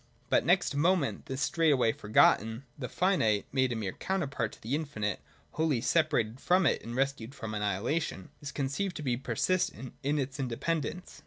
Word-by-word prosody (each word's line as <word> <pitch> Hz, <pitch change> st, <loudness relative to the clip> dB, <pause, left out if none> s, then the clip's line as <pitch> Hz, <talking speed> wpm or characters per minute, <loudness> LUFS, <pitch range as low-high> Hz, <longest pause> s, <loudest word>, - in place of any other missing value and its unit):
But -, -, +4 dB
next -, -, +3 dB
moment 165 Hz, 0 st, +1 dB
this 135 Hz, +1 st, -4 dB
is -, -, +4 dB
straightway 145 Hz, -8 st, +3 dB
forgotten; 110 Hz, +2 st, +3 dB
the 125 Hz, -3 st, -5 dB
finite, 115 Hz, -, +2 dB
made 130 Hz, -1 st, +2 dB
a -, -, -1 dB
mere 105 Hz, -4 st, -2 dB
counterpart 140 Hz, -, -2 dB
to -, -, -15 dB
the 115 Hz, +5 st, -3 dB
infinite, 135 Hz, -10 st, -2 dB, 0.3 s
wholly 155 Hz, -5 st, +1 dB
separated 135 Hz, -6 st, +1 dB
from 180 Hz, 0 st, +3 dB
it, -, -, +2 dB
and 115 Hz, +1 st, -6 dB
rescued 135 Hz, -1 st, -1 dB
from 115 Hz, -4 st, -6 dB
annihilation, 105 Hz, -, -1 dB
is 145 Hz, -2 st, -5 dB
con 140 Hz, -, -2 dB
ceived 180 Hz, +8 st, -2 dB
to 155 Hz, -, -6 dB
be 125 Hz, -4 st, +1 dB
persistent 135 Hz, -, -1 dB
in 145 Hz, +2 st, 0 dB
its 135 Hz, 0 st, -3 dB
independence. 155 Hz, +7 st, -3 dB
135 Hz, 175 wpm, -30 LUFS, 115-155 Hz, 0.3 s, But